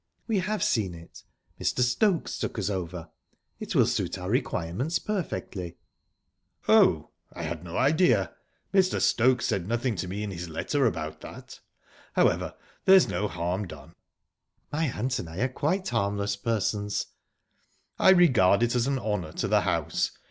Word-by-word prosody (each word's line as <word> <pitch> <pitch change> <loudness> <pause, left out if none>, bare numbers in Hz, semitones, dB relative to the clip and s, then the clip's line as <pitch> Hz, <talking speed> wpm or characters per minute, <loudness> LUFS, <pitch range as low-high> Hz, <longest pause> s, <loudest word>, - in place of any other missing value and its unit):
"We 220 -4 +1
have 210 +4 -1
seen 100 -7 0
it. 85 0 -13 0.4
Mr. - - 0
Stokes 165 - +1
took - - -3
us 105 -1 -1
over. 85 -3 -5 0.5
It - - -5
will - - +6
suit - - -1
our - - -4
requirements 125 - -1
perfectly." 130 - -4 0.9
"Oh...I 85 - +2
had 80 0 -4
no 85 -1 -6
idea. 130 - +3 0.4
Mr. 190 -1 +3
Stokes 125 +1 +3
said 90 -2 -1
nothing 120 +1 0
to 90 - -3
me 100 +3 -4
in 105 - -4
his 90 -1 -6
letter 130 - 0
about 80 -5 -4
that. - - -11 0.5
However, - - +1 0.3
there's 190 -1 +7
no 105 - -1
harm 90 +2 -3
done." 75 -5 -12 0.8
"My 160 +2 0
aunt 125 +3 -2
and 80 - -6
I 80 - -9
are 130 - +3
quite 165 +9 -1
harmless 100 0 0
persons." 105 -1 -1 0.9
"I - - +6
regard 125 - +5
it 120 - +1
as 120 0 +1
an 140 -1 +1
honour 105 -10 -3
to - - -2
the - - +3
house. - - 0
105 Hz, 155 wpm, -27 LUFS, 90-135 Hz, 0.9 s, there's